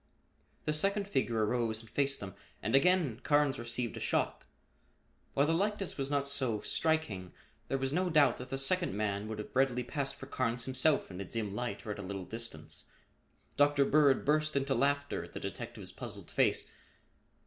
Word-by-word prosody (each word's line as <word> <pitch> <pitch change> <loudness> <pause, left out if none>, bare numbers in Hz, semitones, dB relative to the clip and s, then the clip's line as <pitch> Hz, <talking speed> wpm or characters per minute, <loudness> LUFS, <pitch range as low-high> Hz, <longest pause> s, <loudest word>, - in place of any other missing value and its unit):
The 150 - +1
second 200 +6 +1
figure 120 - +1
arose 115 -1 0
and 115 - -15
faced 135 +5 0
them 95 -2 -6 0.3
and 110 +4 -1
again 145 -5 +4
Carnes 145 -3 +2
received 120 0 -2
a - - -5
shock. - - -1 0.9
While 140 - +4
the 160 - +2
likeness 200 +2 0
was 135 -1 -2
not 140 -1 +1
so, 130 -6 0
striking, 135 - 0 0.3
there 135 - 0
was 135 +1 -1
no 180 +2 +1
doubt 145 -6 +5
that 125 0 -8
the 135 - -2
second 170 - +1
man 105 -1 -1
would 110 0 -4
have 105 - -7
readily 125 -2 +3
passed 140 +2 -2
for - - -9
Carnes 125 -3 -1
himself 130 -1 +2
in 90 +1 -6
a - - -2
dim 105 +1 -3
light 120 +2 -3
or 105 - -3
at 105 - -5
a - - -3
little 95 -1 -5
distance. 115 -9 -5 0.7
Dr. 145 -1 +5
Bird 145 -2 +4
burst 155 +1 +2
into 140 0 +1
laughter 140 +3 +1
at - - -12
the - - -4
detective's - - -6
puzzled - - -7
face. - - +2
135 Hz, 185 wpm, -32 LUFS, 115-145 Hz, 0.9 s, doubt